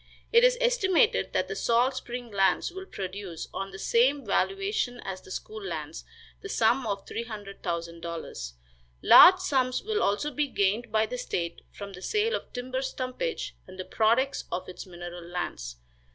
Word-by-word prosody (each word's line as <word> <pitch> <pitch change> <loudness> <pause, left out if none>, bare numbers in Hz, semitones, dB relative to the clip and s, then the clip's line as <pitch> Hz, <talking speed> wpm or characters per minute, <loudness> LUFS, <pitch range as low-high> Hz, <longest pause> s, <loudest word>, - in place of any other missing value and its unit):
It 470 +1 +7
is - - +5
estimated 485 -4 +3
that - - +1
the - - -4
salt 245 +3 +2
spring 245 -2 -6
lands 195 -2 +2
will 380 +1 -8
produce, 190 - -6
on 195 - -4
the 195 - -9
same 255 +6 +2
valuation 390 - 0
as 190 -1 -5
the - - -16
school 430 - -6
lands, - - -5 0.4
the 400 - -7
sum 235 - +2
of 200 -1 -3
$300,000. 170 - -5 0.5
Large 370 +1 +9
sums 260 -8 0
will 430 0 -1
also 250 +9 +1
be 295 +2 0
gained 215 0 0
by 220 0 +3
the 250 +3 -5
state 170 -6 -3
from 200 -1 -9
the 180 - -10
sale 430 - 0
of - - -4
timber 255 +1 -3
stumpage, 265 - -3
and 185 0 -12
the 185 - -4
products 235 +5 +1
of 175 - -3
its 185 - -9
mineral 175 -1 -8
lands. 170 - -5
235 Hz, 165 wpm, -28 LUFS, 190-295 Hz, 0.5 s, Large